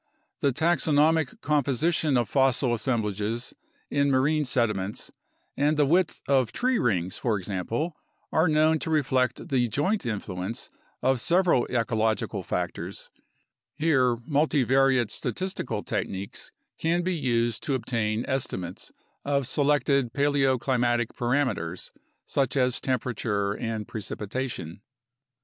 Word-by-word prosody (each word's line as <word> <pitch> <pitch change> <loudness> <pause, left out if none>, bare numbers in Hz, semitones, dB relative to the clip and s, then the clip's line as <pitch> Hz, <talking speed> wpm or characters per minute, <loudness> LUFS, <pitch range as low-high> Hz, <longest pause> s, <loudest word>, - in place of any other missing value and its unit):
The 140 - +2
taxonomic 160 0 +2
composition 150 +1 +1
of 120 -3 +1
fossil 135 0 +2
assemblages 110 -1 -2 0.4
in 140 0 +2
marine 145 +3 +2
sediments 110 -7 -1 0.4
and 150 +2 +2
the 150 - +4
width 170 +3 +1
of 130 -5 +3
tree 255 0 +1
rings, 95 -6 0
for 115 -4 +1
example, 105 - -3 0.4
are 160 +3 +3
known 155 +1 +3
to 160 - -4
reflect 130 -5 +1
the 125 -3 +2
joint 145 - 0
influence 100 -1 -4 0.3
of 130 -1 +3
several 170 -2 +3
ecological 110 -4 0
factors; 90 +1 -4 0.6
here 135 -6 +2
multi 145 -2 +2
variate 130 -3 +3
statistical 190 - -3
techniques 95 +1 -4 0.3
can 170 +2 +1
be 185 +1 0
used 120 -6 0
to 140 - +1
obtain 115 -2 -1
estimates 95 -9 -3 0.3
of 140 -1 0
selected 140 -3 +2
paleoclimatic 130 -4 +2
parameters 120 - -1 0.3
such 140 0 0
as 125 -2 +1
temperature 110 -6 -1
and 110 -1 -4
precipitation. 105 -4 -5
130 Hz, 115 wpm, -26 LUFS, 110-145 Hz, 0.6 s, the